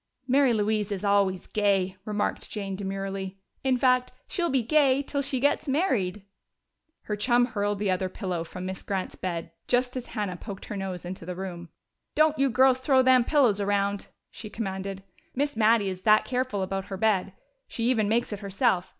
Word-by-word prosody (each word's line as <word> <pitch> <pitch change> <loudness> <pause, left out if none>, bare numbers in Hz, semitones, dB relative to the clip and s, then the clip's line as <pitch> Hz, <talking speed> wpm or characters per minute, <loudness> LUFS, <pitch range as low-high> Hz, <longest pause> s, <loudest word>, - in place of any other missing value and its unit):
"Mary 270 0 +4
Louise 210 -1 0
is 200 0 -3
always 200 -2 +2
'Gay,'" 195 -3 +1
remarked 210 -1 -2
Jane 195 -2 -4
demurely. 195 0 -4 0.3
"In 260 -1 +2
fact, 255 0 +3 0.2
she'll 345 -2 -1
be 265 -3 +1
'Gay' 280 +1 +3
till 280 0 -2
she 275 -2 -2
gets 285 +3 +1
married." 240 - 0 0.8
Her 210 - -2
chum 240 +3 +3
hurled 205 -3 -1
the 200 -1 0
other 185 0 -1
pillow 180 -4 -3
from 180 +2 -8
Miss 190 0 -5
Grant's 190 -2 -3
bed 170 -3 -4 0.2
just 250 +1 +1
as 255 -1 -4
Hannah 205 -5 -3
poked 195 +1 -8
her 210 - -6
nose 190 -3 -5
into 180 0 -6
the 180 +1 -5
room. 175 -2 -6 0.5
"Don't 310 -1 +3
you 275 0 +3
girls 260 +1 +4
throw 260 0 +4
them 255 -1 +6
pillows 245 -7 +3
around!" 200 0 0 0.2
she 215 - -9
commanded. 195 -2 -4 0.3
"Miss 285 +1 0
Mattie 220 -2 +3
is 185 -1 -5
that 215 +1 +5
careful 250 -6 -1
about 195 0 -3
her 195 - -6
bed 195 -2 +1 0.3
she 230 - -4
even 220 -5 +2
makes 230 0 +1
it 205 - -5
herself. 195 -2 0
205 Hz, 185 wpm, -27 LUFS, 190-255 Hz, 0.8 s, them